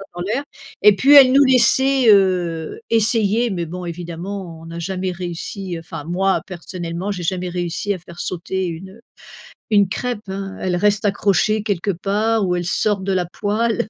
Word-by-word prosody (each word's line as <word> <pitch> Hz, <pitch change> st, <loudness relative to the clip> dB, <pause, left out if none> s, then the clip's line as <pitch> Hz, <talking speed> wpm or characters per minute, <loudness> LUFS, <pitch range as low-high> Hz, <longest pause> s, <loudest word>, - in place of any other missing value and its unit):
ça 195 Hz, -, -8 dB
dans 175 Hz, -, -5 dB
l'air 230 Hz, +9 st, -2 dB, 0.4 s
et 210 Hz, 0 st, +7 dB
puis 275 Hz, +7 st, +5 dB
elle 270 Hz, -3 st, +9 dB
nous 280 Hz, +2 st, +6 dB
laissait, 260 Hz, +1 st, +4 dB
heu, 180 Hz, -5 st, +2 dB
essayer. 225 Hz, 0 st, +2 dB
Mais 175 Hz, -4 st, -3 dB
bon 180 Hz, +2 st, -7 dB
évidemment, 175 Hz, +1 st, -6 dB
on 165 Hz, -, -11 dB
a 170 Hz, -, -7 dB
jamais 185 Hz, +1 st, -3 dB
réussi 180 Hz, +1 st, -5 dB
enfin 165 Hz, -3 st, -8 dB
moi 190 Hz, +3 st, 0 dB
personnellement, 175 Hz, +1 st, -5 dB
j'ai 180 Hz, -3 st, -6 dB
jamais 180 Hz, +1 st, -2 dB
réussi 175 Hz, +3 st, -2 dB
à 185 Hz, -, -7 dB
faire 170 Hz, 0 st, -13 dB
sauter 185 Hz, +1 st, -3 dB
une, 175 Hz, +3 st, -7 dB
heu, 230 Hz, -, -17 dB, 0.7 s
une 205 Hz, -3 st, +4 dB
crêpe, 235 Hz, 0 st, -4 dB
hein. 195 Hz, 0 st, -5 dB
Elle 180 Hz, -1 st, -1 dB
reste 205 Hz, +3 st, +2 dB
accrochée 205 Hz, +1 st, +1 dB
quelque 200 Hz, -2 st, -1 dB
part 210 Hz, +4 st, 0 dB
où 180 Hz, -, 0 dB
elle 175 Hz, -, -2 dB
sort 205 Hz, +2 st, 0 dB
de 195 Hz, 0 st, -2 dB
la 180 Hz, -1 st, 0 dB
poêle 220 Hz, +5 st, -1 dB
190 Hz, 180 wpm, -20 LUFS, 175-210 Hz, 0.7 s, elle